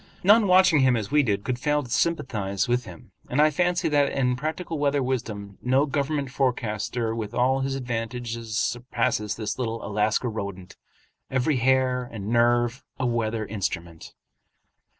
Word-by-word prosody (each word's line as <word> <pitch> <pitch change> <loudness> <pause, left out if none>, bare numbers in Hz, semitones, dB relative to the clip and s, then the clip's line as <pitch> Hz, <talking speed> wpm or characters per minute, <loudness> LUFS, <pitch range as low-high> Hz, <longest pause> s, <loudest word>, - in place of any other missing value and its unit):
None 210 +3 +6
watching 185 -4 +5
him 130 -2 +4
as 105 -2 -4
we 150 0 +5
did 105 -6 0
could 125 -1 -2
fail 150 +2 +1
to 125 - -11
sympathize 105 - 0
with 120 0 0
him; 85 -5 -12 0.2
and 130 - -1
I 155 +1 +5
fancy 175 +3 +1
that 145 -2 +2
in 125 -2 +1
practical 160 +3 -4
weather 145 -1 +1
wisdom 110 -6 -4
no 130 +3 +3
government 140 -1 -2
forecaster 120 -3 -1
with 115 0 -5
all 130 +2 +2
his 135 0 -1
advantages 115 -2 -4
surpasses 120 -4 -1
this 110 +2 -4
little 115 -2 -3
Alaska 105 +4 0
rodent, 100 -5 -6 0.5
every 130 +2 +1
hair 125 0 +2
and 105 -2 -6
nerve 120 +2 +2 0.2
a 130 - 0
weather 115 -2 -1
instrument. 85 -6 -5
125 Hz, 155 wpm, -25 LUFS, 110-135 Hz, 0.5 s, None